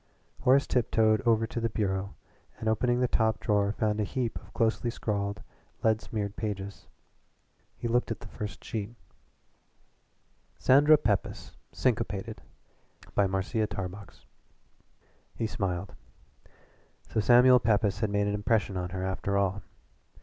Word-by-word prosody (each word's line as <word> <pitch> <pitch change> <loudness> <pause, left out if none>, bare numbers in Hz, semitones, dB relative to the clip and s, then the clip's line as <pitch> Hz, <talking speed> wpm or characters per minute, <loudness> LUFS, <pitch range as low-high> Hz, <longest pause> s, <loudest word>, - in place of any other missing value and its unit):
Horace 135 +2 +4
tiptoed 110 -2 +2
over 115 -1 +4
to 115 - -4
the 115 0 0
bureau 100 -2 -2 0.4
and 110 - -5
opening 120 +3 +2
the 125 - +3
top 110 -2 +1
drawer 100 -3 +1
found 105 0 -1
a - - +2
heap 120 +2 -2
of - - -18
closely 115 0 0
scrawled, 100 -2 -3 0.4
lead 110 0 +3
smeared 105 -2 -4
pages. 100 -2 -5 0.9
He - - -3
looked 120 +1 +1
at 115 - -3
the 105 - -9
first 105 -1 -7
sheet: 110 +1 -5 1.6
SANDRA 145 +4 +6
PEPYS, 105 -7 -2 0.2
SYNCOPATED 105 -4 -1 0.7
BY 100 - +3
MARCIA 95 +3 -1
TARBOX 100 +1 -7 1.1
He 115 - -2
smiled. 95 -3 -3 1.2
So - - -1
Samuel 125 +3 +6
Pepys 105 -3 +1
had 110 -2 0
made 100 0 +1
an 100 - 0
impression 105 -1 0
on 90 -1 -3
her 95 +1 -4
after 95 +1 -1
all. 100 0 0
105 Hz, 135 wpm, -29 LUFS, 100-115 Hz, 1.6 s, SANDRA